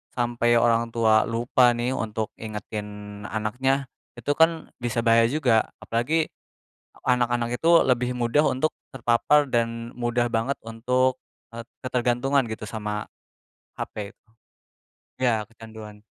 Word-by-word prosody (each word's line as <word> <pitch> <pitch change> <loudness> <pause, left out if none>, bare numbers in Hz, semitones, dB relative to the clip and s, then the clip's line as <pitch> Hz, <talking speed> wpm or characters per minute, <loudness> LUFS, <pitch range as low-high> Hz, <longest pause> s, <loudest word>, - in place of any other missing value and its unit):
sampai 120 -1 +1
orang 115 0 +2
tua 110 -2 +4
lupa 120 +2 +3
nih 120 +2 -1
untuk 110 -1 -3
ingetin 105 -1 -7
anaknya, 130 +6 0 0.3
itu 145 - -2
kan 165 0 +2
bisa 120 0 -1
bahaya 115 0 +5
juga, 125 -7 +2
apalagi 150 +8 0 0.8
anak-anak 120 -1 +1
itu 165 - +2 0.2
lebih 125 -1 +1
mudah 120 +5 +2
untuk 155 +5 +1 0.2
terpapar 135 +4 +2
dan 115 0 -1
mudah 120 0 +1
banget 115 +5 0
untuk, 125 +3 +1 0.4
eee, 115 0 -6 0.2
ketergantungan 130 +2 +1
gitu 110 -1 -6
sama, 105 -1 -4 0.7
HP. 105 -1 -5 1.1
Ya 115 -4 +2
kecanduan. 110 -2 -12
120 Hz, 115 wpm, -25 LUFS, 110-125 Hz, 1.1 s, bahaya